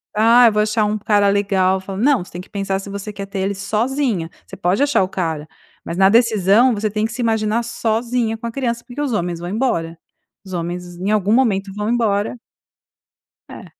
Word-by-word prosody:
'Ah, 230 +3 +6
eu 225 - +3
vou 210 - +2
achar 215 0 +1
um 210 +1 -1
cara 205 -1 +2
legal', 195 -2 +2
falo 195 0 -6
não, 270 -5 +3
você - - -16
tem 175 - -7
que - - -16
pensar 195 -1 -2
se 195 - -9
você 200 +1 -6
quer 200 -1 -6
ter 195 0 -6
ele 195 +1 0
sozinha, 215 - -1 0.2
você - - -10
pode 180 +8 0
achar 285 -8 +3
o 185 - -3
cara, 160 -5 -3 0.4
mas 170 - -5
na 190 0 +6
decisão 225 +1 +4
você 215 0 -1
tem 215 +1 -1
que 225 - -3
se 245 +3 -4
imaginar 220 0 +1
sozinha 230 0 -1
com 235 - -6
a - - -4
criança, 235 -2 -2
porque 255 +4 -6
os 290 -3 -1
homens 175 -5 -2
vão 175 - -5
embora, 170 -8 -1 0.5
os 190 - -9
homens 175 +1 -4
em 190 +4 -2
algum 210 -1 +2
momento 210 -6 +2
vão 210 +1 -2
embora" 220 -1 0 1.1
É, - - -10
210 Hz, 215 wpm, -19 LUFS, 190-230 Hz, 1.1 s, Ah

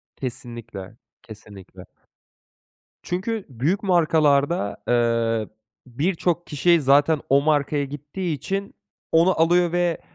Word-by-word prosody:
Kesinlikle, 115 -5 -7 0.3
kesinlikle. 100 -4 -13 1.2
Çünkü 200 +4 -3
büyük 145 - -1
markalarda, 155 - +2
eee, 115 -2 +1 0.4
birçok 170 +5 -1
kişi 165 +3 +2
zaten 145 +3 +3
o 140 +1 +4
markaya 145 -1 +1
gittiği 145 +5 -5
için 195 +8 -5 0.4
onu 170 +3 +3
alıyor 175 +1 +3
ve, 175 -1 0
145 Hz, 95 wpm, -23 LUFS, 120-175 Hz, 1.2 s, o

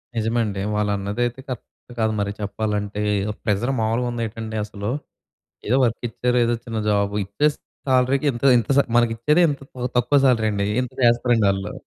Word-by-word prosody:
నిజమండి. 110 -3 0
వాళ్ళ 105 0 0
అన్నదైతే 120 +5 -2
కరక్టు 125 0 -9
కాదు 110 0 +1
మరి 100 0 -1
చెప్పాలంటే. 105 0 -2 0.2
ఏదో 105 0 -2
ప్రెజర్ 110 +4 0
మామూలుగా 115 +3 0
ఉందేంటండి 110 -1 -4
అసలు. 105 0 -5 0.8
ఏదో 125 - +3
వర్క్ 115 -1 -1
ఇచ్చారు. 125 +2 0
ఏదో 120 0 +1
చిన్న 115 -2 -4
జాబ్. 100 -1 +1
ఇచ్చే 105 +10 +1 0.4
సాలరీ‌కి 130 +2 +2
ఇంత, 120 - -8 0.2
ఇంత 115 - -3
స - - +8 0.2
మనకిచ్చేది 120 +8 +3
ఇంత 140 -2 -3 0.4
తక్కువ 125 +4 +3
సాలరండి. 110 -5 +2 0.2
ఇంత 125 - -6
చేస్తారండి 120 -2 +3
వాళ్ళు. 100 +5 -3
115 Hz, 150 wpm, -22 LUFS, 105-120 Hz, 0.8 s, స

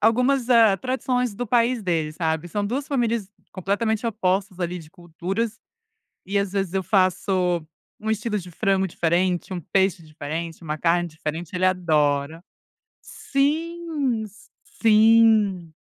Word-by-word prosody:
algumas, 250 +3 +2
ah, 225 -5 +6
tradições 250 -2 -1
do 245 +3 -4
país 235 0 +2
dele, 160 -4 -1
sabe. 160 0 -2
São 205 +3 -2
2 265 +6 -2
famílias 235 -7 -1 0.2
completamente 210 +4 -1
opostas, 190 -3 -1
ali, 175 0 -2
de 155 -1 -13
culturas, 195 +6 -4 0.7
e 200 +2 0
às 200 -1 -1
vezes 195 -3 -1
eu 190 - +1
faço 185 -2 +1 0.4
um 220 +1 -2
estilo 215 0 -1
de 180 -2 -9
frango 190 +2 +1
diferente, 175 +1 0
um 180 - -3
peixe 190 +1 +1
diferente, 160 +2 -6
uma 155 -1 -4
carne 175 +1 +1
diferente, 160 +2 -6
ele 185 +1 +2
adora. 155 -3 +1 0.6
Sim, 300 -3 -1
s 215 +1 -15 0.3
sim. 215 -5 +4
195 Hz, 135 wpm, -23 LUFS, 175-225 Hz, 0.7 s, ah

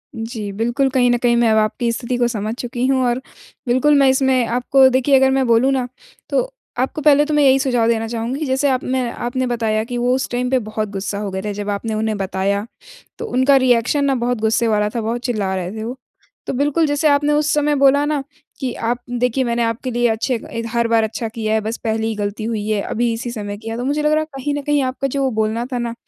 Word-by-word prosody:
जी, 225 -2 -5
बिल्कुल 240 +6 0
कहीं 255 -2 +2
न 240 - +2
कहीं 240 -1 +4
मैं 235 -1 +3
अब 220 - +3
आपकी 220 +2 +1
स्थिति 245 +1 -3
को 240 -1 +2
समझ 215 -2 -3
चुकी 245 0 -2
हूँ 265 -1 +2
और 245 +1 0 0.5
बिल्कुल 260 +5 +3
मैं 275 - +5
इसमें 260 -2 +2
आपको 250 +3 +4
देखिए 260 +2 +3
अगर 265 0 +4
मैं 265 0 +2
बोलूँ 235 +3 +4
ना, 260 -2 0 0.4
तो - - -1 0.3
आपको 265 +4 -1
पहले 295 0 +5
तो 305 - -2
मैं 295 -1 +4
यही 270 -1 +5
सुझाव 245 -4 +1
देना 225 -1 0
चाहूँगी 240 +6 -3
जैसे 265 +1 +1
आपने 255 -1 -1
आपने 245 +2 -2
बताया 225 -3 0
कि 245 +2 -5
वो 245 +1 +1
उस 265 - -2
टाइम 250 +1 -1
पे 260 0 +2
बहुत 215 -1 -3
गुस्सा 200 0 -4
हो 205 -1 -4
गए 190 0 -3
थे 210 +1 -4
जब 205 0 -5
आपने 205 +2 -2
उन्हें 215 0 -1
बताया, 195 +1 -1 0.5
तो 460 - -5
उनका 270 - +3
रिएक्शन 260 +2 +3
ना 275 -1 +2
बहुत 245 0 -1
गुस्से 220 +1 +2
वाला 210 -1 +1
था, 230 +2 -3
बहुत 230 +2 -2
चिल्ला 205 -6 -1
रहे 180 -1 -3
थे 215 - -4
वो। 245 +4 -5 0.5
तो - - -2
बिल्कुल 290 +5 +1
जैसे 290 +1 +1
आपने 290 +1 +3
उस 295 0 +2
समय 295 0 +2
बोला 280 +1 +4
ना, 295 -2 -1 0.4
कि 255 -3 -2
आप 235 +1 -1
देखिए 250 +1 0
मैंने 235 -1 0
आपके 230 +3 -2
लिए 240 0 +2
अच्छे 225 +3 0 0.2
एक 230 0 -4
हर 235 -1 +1
बार 230 -1 +3
अच्छा 225 +1 -3
किया 220 -1 -2
है 220 - +2
बस 220 +2 -4
पहली 220 -1 -1
ही 225 - -2
गलती 205 +1 -3
हुई 220 -2 -2
है 210 -2 +1
अभी 235 +3 -1
इसी 235 +1 -4
समय 205 -3 -5
किया 225 +1 -6
तो 245 - -3
मुझे 290 +3 0
लग 300 - +2
रहा 310 - +3
है - - -3
कहीं 285 +2 -2
न 290 - -2
कहीं 290 0 +1
आपका 260 +1 -2
जो 275 0 0
बोलना 220 +1 -1
था - - 0
ना, 235 -1 -3
240 Hz, 245 wpm, -19 LUFS, 220-265 Hz, 0.5 s, मैं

